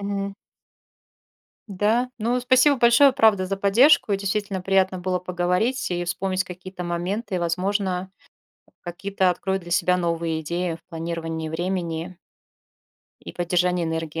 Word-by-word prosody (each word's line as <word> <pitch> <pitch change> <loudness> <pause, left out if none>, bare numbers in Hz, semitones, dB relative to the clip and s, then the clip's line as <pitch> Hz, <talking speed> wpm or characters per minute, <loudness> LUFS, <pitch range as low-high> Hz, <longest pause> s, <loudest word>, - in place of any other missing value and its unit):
Мгм. 200 0 -3 1.3
Да, 215 +5 +1
ну, 235 +3 0
спасибо 255 +3 +4
большое, 240 +3 +6
правда, 220 -7 +3
за 195 +1 -2
поддержку, 215 +3 +4
действительно 195 -1 -2
приятно 190 -1 +2
было 180 0 -1
поговорить 180 +7 -1
и 175 0 -1
вспомнить 185 +1 -1
какие-то 180 0 -8
моменты, 185 +4 -3
возможно, 185 +2 -1 0.7
какие-то 185 +2 -1
открою 190 +2 -2
для 175 -1 -11
себя 180 +1 +2
новые 165 -2 -1
идеи 170 +2 -2
в 165 0 -19
планировании 165 -1 -4
времени 175 0 -3 1.0
и - - -9
поддержании 180 0 0
энергии. 160 0 -3
185 Hz, 125 wpm, -23 LUFS, 175-200 Hz, 1.3 s, большое